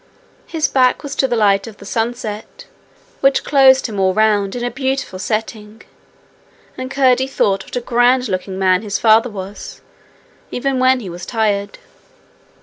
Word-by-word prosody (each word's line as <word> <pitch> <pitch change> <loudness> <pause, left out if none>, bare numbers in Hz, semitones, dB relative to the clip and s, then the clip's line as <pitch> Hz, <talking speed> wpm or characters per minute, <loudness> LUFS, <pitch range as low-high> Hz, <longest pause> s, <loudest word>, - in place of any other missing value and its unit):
His 315 -3 -1
back 255 -2 +2
was 285 -1 -6
to 265 - +2
the 240 - -1
light 200 -2 +2
of 215 -2 -11
the 200 - -13
sunset, 225 - -4 0.5
which 275 0 +2
closed 265 -2 +5
him 210 -4 -4
all 190 -1 +2
round 210 -2 +2
in 245 - -4
a 245 - -2
beautiful 265 -6 -3
setting, 215 +1 -4 0.9
and 255 0 -6
Curdie 265 -1 +2
thought 195 -7 0
what - - -10
a 245 - -1
grand 245 +2 +2
looking 185 -1 -4
man 185 -1 +2
his 205 -2 -3
father 225 +2 +4
was, 200 -1 -8 0.7
even 265 +1 -2
when 255 0 +3
he 195 - -7
was 175 +1 -9
tired. 210 -3 -1
225 Hz, 160 wpm, -17 LUFS, 200-260 Hz, 0.9 s, closed